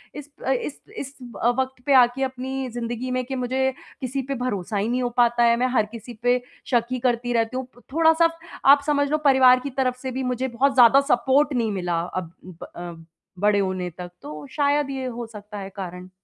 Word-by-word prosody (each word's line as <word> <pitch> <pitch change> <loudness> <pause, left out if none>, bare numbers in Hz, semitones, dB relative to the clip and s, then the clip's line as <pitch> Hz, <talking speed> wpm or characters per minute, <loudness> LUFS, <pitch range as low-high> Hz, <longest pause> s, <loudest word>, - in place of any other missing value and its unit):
इस 295 0 -8 0.2
अ, - - +3
इस 270 +2 -2 0.2
इस 275 0 -6 0.3
अ, 240 - +5
वक़्त 260 -1 -3
पे 285 - +3
आके 255 +1 +5
अपनी 265 0 -3
ज़िंदगी 240 +1 -4
में 255 0 0
कि 265 +1 -4
मुझे 260 +1 0 0.3
किसी 265 +1 -2
पे 275 - 0
भरोसा 205 -3 -2
ही 200 +2 0
नहीं 250 +1 0
हो 245 - 0
पाता 240 0 +4
है। 235 0 +5
मैं 250 +1 +2
हर 215 - +4
किसी 235 +1 -9
पे 245 0 +3 0.3
शक 235 -2 +2
ही 255 - -1
करती 245 0 -2
रहती 230 +2 0
हूँ। 260 - -3
प 245 - -18
थोड़ा-सा 325 +1 +4 0.4
आप 280 +1 +7
समझ 285 -1 +2
लो 305 - +3
परिवार 255 -1 +6
की 280 - -5
तरफ 255 -1 0
से 260 -1 -4
भी 260 +1 -3
मुझे 250 +1 -1
बहुत 265 +3 +1
ज़्यादा 255 +2 +7
सपोर्ट 275 +4 +3
नहीं 230 -4 0
मिला 175 -4 -1 0.2
अब 180 -3 -4 0.4
अ, 175 0 -6 0.5
बड़े 205 0 +3
होने 185 -2 -1
तक 180 -1 -7
तो 150 -1 -8
शायद 290 0 +1
ये 265 -1 -4
हो 240 -1 -5
सकता 210 -1 -10
है 195 -1 -6
कारण। 180 -2 -7
250 Hz, 215 wpm, -23 LUFS, 225-265 Hz, 0.5 s, आप